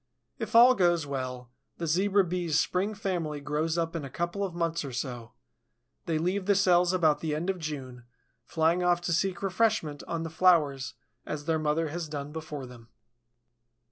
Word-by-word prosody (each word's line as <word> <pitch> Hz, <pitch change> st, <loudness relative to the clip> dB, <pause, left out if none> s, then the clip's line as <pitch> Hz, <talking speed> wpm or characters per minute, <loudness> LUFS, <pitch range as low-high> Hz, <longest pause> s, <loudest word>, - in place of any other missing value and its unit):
If 225 Hz, -1 st, -4 dB
all 245 Hz, +2 st, +9 dB
goes 175 Hz, -6 st, +2 dB
well, 130 Hz, -3 st, -5 dB, 0.3 s
the 170 Hz, -, -3 dB
Zebra 195 Hz, +5 st, +3 dB
Bee's 175 Hz, -3 st, -1 dB
spring 190 Hz, +6 st, 0 dB
family 175 Hz, -7 st, -2 dB
grows 150 Hz, +3 st, -1 dB
up 165 Hz, 0 st, -1 dB
in 165 Hz, -, -3 dB
a 140 Hz, -, -6 dB
couple 175 Hz, +8 st, -3 dB
of 185 Hz, -4 st, -4 dB
months 170 Hz, -1 st, -1 dB
or 140 Hz, -, -6 dB
so; 120 Hz, -2 st, -5 dB, 0.7 s
they 165 Hz, -2 st, +1 dB
leave 185 Hz, +4 st, -1 dB
the 200 Hz, -, +4 dB
cells 180 Hz, -2 st, +4 dB
about 160 Hz, -5 st, +3 dB
the 155 Hz, -1 st, -2 dB
end 170 Hz, +5 st, 0 dB
of 185 Hz, -, -8 dB
June, 130 Hz, -6 st, -6 dB, 0.4 s
flying 165 Hz, +2 st, +1 dB
off 175 Hz, -1 st, +3 dB
to 175 Hz, -1 st, -1 dB
seek 185 Hz, +3 st, 0 dB
refreshment 185 Hz, -7 st, 0 dB
on 165 Hz, -1 st, -2 dB
the 165 Hz, -, -5 dB
flowers 155 Hz, -6 st, +2 dB, 0.3 s
as 145 Hz, -1 st, -5 dB
their 160 Hz, -1 st, +1 dB
mother 155 Hz, +1 st, 0 dB
has 165 Hz, 0 st, -5 dB
done 145 Hz, -1 st, -5 dB
before 155 Hz, -3 st, -6 dB
them. 120 Hz, -2 st, -13 dB
165 Hz, 180 wpm, -28 LUFS, 150-180 Hz, 0.7 s, all